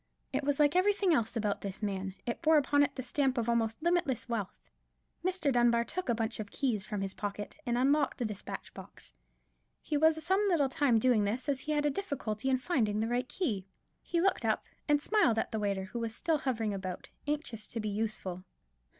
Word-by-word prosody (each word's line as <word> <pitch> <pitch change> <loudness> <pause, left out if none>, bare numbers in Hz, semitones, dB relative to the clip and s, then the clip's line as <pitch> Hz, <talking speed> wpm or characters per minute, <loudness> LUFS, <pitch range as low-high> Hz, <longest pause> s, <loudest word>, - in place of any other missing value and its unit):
It - - 0
was 285 0 0
like 295 +2 +4
everything 390 -1 +3
else 235 -4 +1
about 210 -2 -1
this 195 +1 -6
man: 195 -2 -2
it 235 - -3
bore 320 -1 +5
upon 285 0 +3
it 285 - +2
the 260 - -4
stamp 265 +1 +1
of 235 -1 0
almost 230 +2 0
limitless 340 -9 +1
wealth. 225 -5 -3 0.7
Mr. 360 -6 +1
Dunbar 240 -1 +4
took 360 +5 -4
a 235 - +3
bunch 225 +1 -2
of 210 -2 -5
keys 225 -8 -1
from 210 -2 -3
his 195 -1 -3
pocket, 205 0 -5
and 240 0 +1
unlocked 280 +3 +2
his 240 - -1
despatch 210 -2 -7
box. - - -12 0.7
He 300 - -1
was 315 0 +3
some 380 +3 +3
little 295 -7 +3
time 260 -3 +3
doing 225 -2 +3
this, 225 +7 -1
as 280 -2 +1
he 305 - -4
had 295 -1 +1
a 295 - +3
difficulty 265 - -3
in 260 - +3
finding 235 -8 0
the 220 - 0
right 245 +2 -1
key. 215 - -2 0.3
He 340 - -1
looked 385 +1 +2
up - - +1 0.2
and 295 -1 +4
smiled 300 - +3
at - - -1
the 220 - -1
waiter, 200 -2 -1
who 190 +5 -5
was 225 -1 -3
still 325 0 +1
hovering 225 -6 -1
about, 185 -2 -5 0.2
anxious 290 -7 -3
to 230 - -5
be 215 -1 -2
useful. 200 -4 -3
245 Hz, 210 wpm, -31 LUFS, 215-295 Hz, 0.7 s, bore